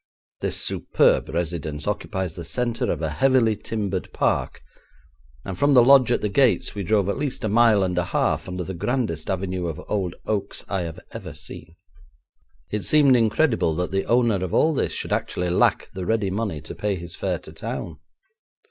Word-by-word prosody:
This -, -, 0 dB
superb -, -, +2 dB
residence 80 Hz, -3 st, -3 dB
occupies 95 Hz, -4 st, -3 dB
the 85 Hz, -, -7 dB
centre 120 Hz, +6 st, -1 dB
of 80 Hz, -1 st, -3 dB
a 80 Hz, -, -1 dB
heavily 125 Hz, -, +3 dB
timbered 100 Hz, -4 st, -4 dB
park, -, -, -1 dB, 0.8 s
and 95 Hz, -2 st, -6 dB
from 145 Hz, -1 st, +4 dB
the 125 Hz, -, +8 dB
lodge 130 Hz, -1 st, +6 dB
at -, -, +1 dB
the 105 Hz, -, 0 dB
gates 125 Hz, +4 st, +2 dB
we 100 Hz, -, -4 dB
drove 100 Hz, +1 st, +1 dB
at 100 Hz, -, -1 dB
least 140 Hz, -3 st, -3 dB
a -, -, +1 dB
mile 110 Hz, -1 st, +4 dB
and 90 Hz, -1 st, -1 dB
a 90 Hz, -, 0 dB
half -, -, 0 dB
under 90 Hz, 0 st, -4 dB
the 95 Hz, -, -5 dB
grandest 105 Hz, -, -2 dB
avenue 95 Hz, -2 st, -2 dB
of 80 Hz, -3 st, -5 dB
old 95 Hz, -5 st, -2 dB
oaks 100 Hz, -2 st, -2 dB
I 95 Hz, -2 st, -1 dB
have 85 Hz, -2 st, -6 dB
ever -, -, -8 dB
seen. 80 Hz, +2 st, -7 dB, 1.0 s
It 105 Hz, -1 st, -2 dB
seemed 145 Hz, -4 st, +5 dB
incredible 115 Hz, -, +2 dB
that 90 Hz, +1 st, -2 dB
the 95 Hz, 0 st, 0 dB
owner 115 Hz, -5 st, +2 dB
of 90 Hz, -, -2 dB
all 160 Hz, +1 st, +4 dB
this -, -, 0 dB
should -, -, -3 dB
actually 90 Hz, -1 st, -1 dB
lack 90 Hz, -, +2 dB
the 95 Hz, -2 st, -6 dB
ready 110 Hz, -4 st, +1 dB
money 100 Hz, -7 st, -3 dB
to 75 Hz, -, -8 dB
pay 105 Hz, -1 st, -2 dB
his 85 Hz, -2 st, -7 dB
fare -, -, -1 dB
to -, -, -12 dB
town! 80 Hz, -3 st, -6 dB
100 Hz, 190 wpm, -23 LUFS, 90-115 Hz, 1.0 s, the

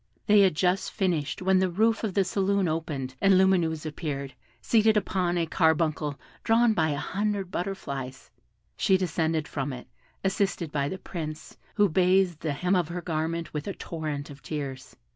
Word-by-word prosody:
They 210 Hz, 0 st, +6 dB
had 190 Hz, -5 st, +5 dB
just 185 Hz, +3 st, +1 dB
finished, 180 Hz, -5 st, -1 dB
when 190 Hz, 0 st, +4 dB
the 190 Hz, 0 st, +2 dB
roof 220 Hz, +6 st, +1 dB
of 205 Hz, -4 st, -2 dB
the 200 Hz, -, +4 dB
saloon 195 Hz, 0 st, +1 dB
opened, 155 Hz, -5 st, -3 dB
and 195 Hz, -1 st, +5 dB
Lumineuse 175 Hz, -5 st, +2 dB
appeared, 145 Hz, -4 st, -4 dB, 0.3 s
seated 220 Hz, -1 st, +3 dB
upon 185 Hz, -3 st, 0 dB
a 170 Hz, -, +1 dB
carbuncle 160 Hz, -3 st, +1 dB, 0.2 s
drawn 230 Hz, 0 st, +4 dB
by 160 Hz, -5 st, +1 dB
a 145 Hz, -, -1 dB
hundred 195 Hz, +4 st, -2 dB
butterflies; 140 Hz, -9 st, -5 dB, 0.4 s
she 190 Hz, -, +3 dB
descended 160 Hz, -3 st, -1 dB
from 140 Hz, -1 st, -3 dB
it, 125 Hz, -1 st, -8 dB, 0.4 s
assisted 195 Hz, -4 st, 0 dB
by 140 Hz, -1 st, 0 dB
the 190 Hz, -, -4 dB
Prince, 155 Hz, -4 st, -7 dB, 0.2 s
who 205 Hz, -1 st, +4 dB
bathed 180 Hz, -1 st, +3 dB
the 155 Hz, -3 st, -2 dB
hem 180 Hz, +6 st, +1 dB
of 175 Hz, -4 st, +1 dB
her 175 Hz, +1 st, -5 dB
garment 165 Hz, 0 st, -2 dB
with 150 Hz, +2 st, -4 dB
a 200 Hz, -, -2 dB
torrent 150 Hz, -4 st, -5 dB
of 140 Hz, -, -12 dB
tears. 140 Hz, -4 st, -6 dB
170 Hz, 170 wpm, -27 LUFS, 150-190 Hz, 0.4 s, They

